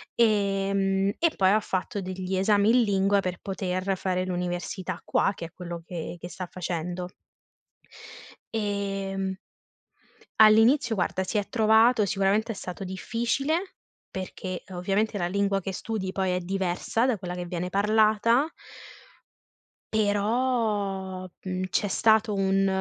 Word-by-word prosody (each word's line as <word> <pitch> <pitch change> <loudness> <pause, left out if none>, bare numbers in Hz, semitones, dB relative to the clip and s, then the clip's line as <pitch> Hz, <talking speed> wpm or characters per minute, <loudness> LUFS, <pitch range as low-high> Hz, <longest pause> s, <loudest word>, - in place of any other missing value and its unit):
ehm, 195 -3 +2
e 335 - +4
poi 190 -1 +4
ha 210 +2 +4
fatto 190 0 -3
degli 185 0 -4
esami 205 +2 +3
in 245 +2 +5
lingua 200 -1 +2
per 185 -2 -3
poter 190 -1 -2
fare 185 0 -1
l'università 180 +1 -3
qua - - +2
che 170 - -6
è 165 - -10
quello 175 -1 -7
che 170 -1 -5
che 175 - -7
sta 185 0 -6
facendo. 180 0 -4 1.5
Ehm 195 -2 -2 1.0
All'inizio, 225 +4 +6
guarda, 190 -1 -1
si 210 +3 -1
è 205 - -2
trovato 220 0 +4
sicuramente 200 +3 +1
è - - -7
stato 190 0 -6
difficile, 255 - -2 0.3
perché 185 -1 -5
ovviamente 195 +4 0
la 175 -3 -1
lingua 200 0 0
che 195 - -4
studi 190 -1 -4
poi 190 -1 0
è 180 - 0
diversa 190 +5 -1
da 255 - +1
quella 180 -2 -6
che 180 0 -5
viene 180 0 -3
parlata 215 +5 +3 1.5
però, 205 -3 0 0.2
mhmm, 185 0 -2
c'è - - +1
stato 220 +2 +3
un 195 0 +2
195 Hz, 130 wpm, -26 LUFS, 185-215 Hz, 1.5 s, All'inizio